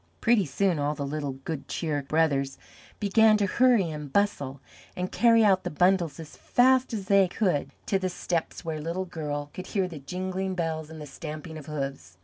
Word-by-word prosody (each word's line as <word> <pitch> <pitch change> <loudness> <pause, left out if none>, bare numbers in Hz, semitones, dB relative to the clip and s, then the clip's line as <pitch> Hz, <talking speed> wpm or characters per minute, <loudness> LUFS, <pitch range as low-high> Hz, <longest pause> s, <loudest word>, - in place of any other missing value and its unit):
Pretty 225 -6 +3
soon 175 +3 +1
all 145 +1 0
the 140 - -3
little 145 -1 -3
Good 140 +1 -6
Cheer 150 -4 -2
Brothers 140 -2 +1 0.4
began 215 +1 +5
to 205 - +1
hurry 230 -4 +3
and 150 -2 -7
bustle 140 -9 0 0.4
and 180 0 -3
carry 230 -1 +5
out 190 -2 +4
the - - -2
bundles 175 -2 +2
as 160 -2 -9
fast 260 +1 +3
as 210 -4 -4
they 195 -1 +5
could 180 -5 0 0.2
to 195 - +1
the 185 -1 -1
steps 175 -1 -3
where 155 -2 -3
Little 170 +4 -3
Girl 145 -4 -4
could 185 - -7
hear 195 -3 0
the 165 -4 -8
jingling 185 +5 -3
bells 160 -3 -2
and 160 0 -9
the 150 - -7
stamping 155 +2 -7
of 155 -3 -9
hoofs. 135 - -5
165 Hz, 190 wpm, -27 LUFS, 150-195 Hz, 0.4 s, began